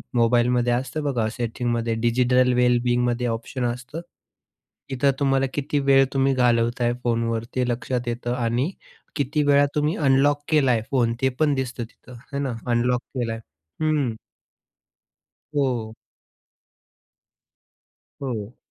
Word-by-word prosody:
मोबाईलमध्ये 120 +1 +3
असतं 130 +5 -2
बघा 125 -6 0
सेटिंगमध्ये 115 0 -2
डिजिटल 125 +1 +3
वेल 125 0 +3
बिंगमध्ये 120 0 +1
ऑप्शन 120 +2 -3
असतं. 125 +7 -4 0.9
इथं 135 +1 +2
तुम्हाला 135 -1 +2
किती 145 0 -1
वेळ 135 -1 +5
तुम्ही 135 0 +2
घालवताय 120 -1 +2
फोनवर 115 -1 0
ते 125 -1 +1
लक्षात 120 0 -2
येतं 120 +1 -2
आणि 120 +6 0 0.4
किती 145 +1 0
वेळा 145 0 +5
तुम्ही 150 +2 +1
अनलॉक 145 0 +3
केलाय 135 -7 +3
फोन 120 -4 +2
ते 130 - +3
पण 150 -2 +3
दिसतं 130 -2 -3
तिथं, 120 +2 -14
आहे 140 +3 -7
ना. 135 -3 -2 0.2
अनलॉक 120 +1 +2
केलाय, 115 -3 -2 0.4
हं. 150 -6 +1 1.4
हो. 125 -6 -1 2.3
हो. 120 -3 -4
125 Hz, 120 wpm, -23 LUFS, 120-135 Hz, 2.3 s, वेळ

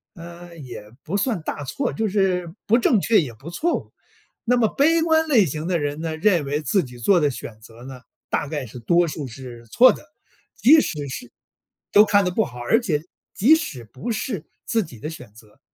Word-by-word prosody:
呃， 170 0 -11
也 120 -7 -10
不 200 +6 -2
算 205 -4 -1
大 150 - -5
错， 250 - -2
就 220 0 -1
是 185 -4 0
不 230 - +5
正 230 -4 +3
确 225 -2 +4
也 125 -6 -6
不 130 +9 -11
错 320 - 0
误。 - - -11 0.5
那 245 +1 +3
么 225 -2 +3
悲 325 +4 +3
观 320 -1 +2
类 240 -10 +4
型 155 +2 -4
的 175 -2 0
人 145 0 -3
呢， 160 -1 -3
认 175 -4 +2
为 145 +2 -2
自 155 +7 +1
己 125 -2 -11
做 175 +9 +4
的 150 - +2
选 115 -3 -9
择 115 +2 -15
呢， 130 -1 -9 0.3
大 150 - -1
概 145 -2 -4
是 125 +2 -10
多 170 +9 +3
数 150 -3 -5
是 120 -1 -10
错 250 - +6
的。 - - -12 0.5
即 285 +10 +6
使 145 - -4
是 250 - -7 0.6
都 210 +1 +7
看 205 -1 +3
得 180 - 0
不 220 +5 +1
好， 125 0 -10
而 120 - +2
且 155 -9 -1 0.3
即 250 +11 +5
使 220 - -5
不 135 - -6
是 210 - -4 0.2
自 230 - +1
己 125 -8 -12
的 150 - -5
选 125 -10 -11
择， 110 -1 -19
170 Hz, 230 characters per minute, -22 LUFS, 135-220 Hz, 0.6 s, 都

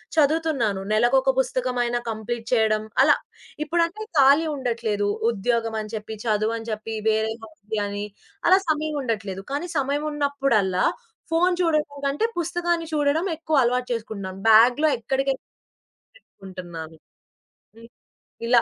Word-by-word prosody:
చదువుతున్నాను. 290 -9 +2
నెలలకొక 245 +5 +4
పుస్తకం 255 -1 -1
అయినా 240 0 0
కంప్లీట్ 225 +1 -4
చేయడం 220 -2 +2 0.2
అలా. 295 +3 +6 0.5
ఇప్పుడంటే 340 +6 0 0.2
ఖాళీ 280 +4 +6
ఉండట్లేదు. 230 -6 -1 0.2
ఉద్యోగం 230 +1 -1
అని 215 0 -8
చెప్పి, 220 +1 -6
చదువు 215 0 +1
అని 225 0 -8
చెప్పి 220 +1 -4
వేరెవో 220 +1 -1
ఉన్నాయని 205 0 -3 0.4
అలా 375 +2 +7
సమయం 310 0 0
ఉండట్లేదు. 200 -6 -3
కానీ 340 +5 -3
సమయం 285 +2 0
ఉన్నప్పుడల్లా 275 -10 +1 0.5
ఫోను 355 +2 +3
చూడడం 305 -3 +1
కంటే 280 +10 0
పుస్తకాన్ని 345 0 -1
చూడడం 300 +3 +1
ఎక్కువ 315 -1 -1
అలవాటు 250 +1 0
చేసుకుంటున్నాను. 200 -4 -5
బాగ్‌లో 245 +8 +6 1.3
పెట్టుకుంటున్నాను. 175 - -10 0.8
హ్మ్. 230 0 -14 0.6
ఇలా. 240 -1 +5
240 Hz, 115 wpm, -24 LUFS, 215-295 Hz, 1.3 s, అలా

